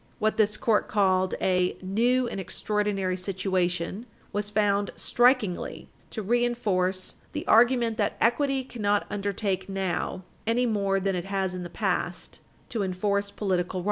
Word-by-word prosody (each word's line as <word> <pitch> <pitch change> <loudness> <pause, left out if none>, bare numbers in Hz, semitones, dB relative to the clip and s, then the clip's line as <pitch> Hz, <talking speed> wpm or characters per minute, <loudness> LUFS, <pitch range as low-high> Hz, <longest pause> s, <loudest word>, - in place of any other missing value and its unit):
What 215 -1 0
this 210 -1 +3
Court 225 -5 +2
called 185 -2 +2
a 180 -1 +1
"new 240 +7 +1
and 200 - -4
extraordinary 195 0 -1
situation" 185 +2 -1 0.3
was 205 0 -1
found 205 -1 +1
"strikingly" 240 -7 +1 0.2
to 220 - -5
reinforce 205 -5 0 0.2
"the - - -4
argument 235 0 +4
that 205 - 0
equity 270 +3 +2
cannot 205 -5 0
undertake 200 -1 -2
now, 190 -1 -2 0.2
any 240 +2 +2
more 200 -4 +1
than 195 0 0
it 175 - -3
has 195 -1 -1
in 180 - -5
the 175 - -6
past, - - -2 0.3
to 230 - -2
enforce 200 +2 0
political 185 -3 -1
rights." - - 0
200 Hz, 140 wpm, -27 LUFS, 185-225 Hz, 0.3 s, argument